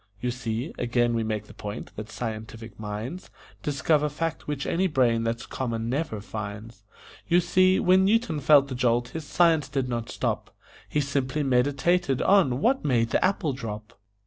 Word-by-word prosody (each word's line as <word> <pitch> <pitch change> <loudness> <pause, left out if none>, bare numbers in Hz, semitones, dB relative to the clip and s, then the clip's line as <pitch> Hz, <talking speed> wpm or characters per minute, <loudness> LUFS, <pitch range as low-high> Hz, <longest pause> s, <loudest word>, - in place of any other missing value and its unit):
You 125 +2 -1
see 120 +2 -4
(again 120 0 +1
we 115 - 0
make 110 -1 -2
the - - -14
point 105 +2 -7
that 110 +1 -7
scientific 110 -1 -6
minds 110 - -6 0.3
Discover 150 +3 +1
facts 160 +2 -4
which 145 -2 -3
any 185 +3 +1
brain 125 -7 +2
that's 115 +1 -2
common 115 -3 -3
never 135 -4 -2
finds), 105 +1 -7 0.5
You 175 +1 +4
see, 185 +2 +3
when 185 +1 +4
Newton 205 -6 +2
felt 140 0 +5
the 135 - -5
jolt, 120 -1 +1
his 160 +3 -6
science 165 -2 +3
did 135 -2 -1
not 120 -2 -3
stop - - -3 0.3
He 150 - +1
simply 140 +1 -1
meditated 135 +3 +2
on 145 -10 +3
"What 265 +3 +2
made 115 -5 +1
the - - +2
apple 185 -6 +1
drop?" 110 -3 -7
130 Hz, 170 wpm, -26 LUFS, 115-155 Hz, 0.5 s, felt